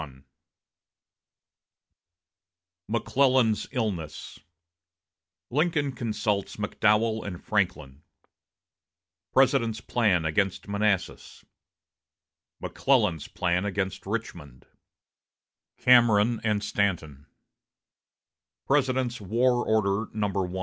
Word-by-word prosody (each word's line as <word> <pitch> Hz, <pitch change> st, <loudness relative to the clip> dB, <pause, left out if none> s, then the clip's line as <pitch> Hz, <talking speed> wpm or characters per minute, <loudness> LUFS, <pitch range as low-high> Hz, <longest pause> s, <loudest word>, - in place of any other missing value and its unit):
XXI 65 Hz, -3 st, -11 dB, 2.6 s
McClellan's 120 Hz, 0 st, +1 dB
Illness 95 Hz, -, -4 dB, 1.1 s
Lincoln 150 Hz, 0 st, 0 dB
Consults 105 Hz, -5 st, -2 dB
McDowell 110 Hz, +1 st, +1 dB
and 90 Hz, -4 st, -6 dB
Franklin 75 Hz, -, -2 dB, 1.3 s
President's 115 Hz, -1 st, +2 dB
Plan 105 Hz, -8 st, +1 dB
against 95 Hz, +6 st, -1 dB
Manassas 100 Hz, -1 st, -2 dB, 1.1 s
McClellan's 80 Hz, -3 st, 0 dB
Plan 90 Hz, +1 st, -1 dB
against 95 Hz, -1 st, -3 dB
Richmond 85 Hz, -, -6 dB, 1.1 s
Cameron 120 Hz, -2 st, +4 dB
and 105 Hz, -2 st, 0 dB
Stanton 80 Hz, -10 st, -2 dB, 1.4 s
President's 130 Hz, -4 st, 0 dB
War 120 Hz, +5 st, +1 dB
Order 105 Hz, -1 st, 0 dB
No. 100 Hz, -3 st, -1 dB
105 Hz, 65 wpm, -26 LUFS, 95-115 Hz, 2.6 s, Cameron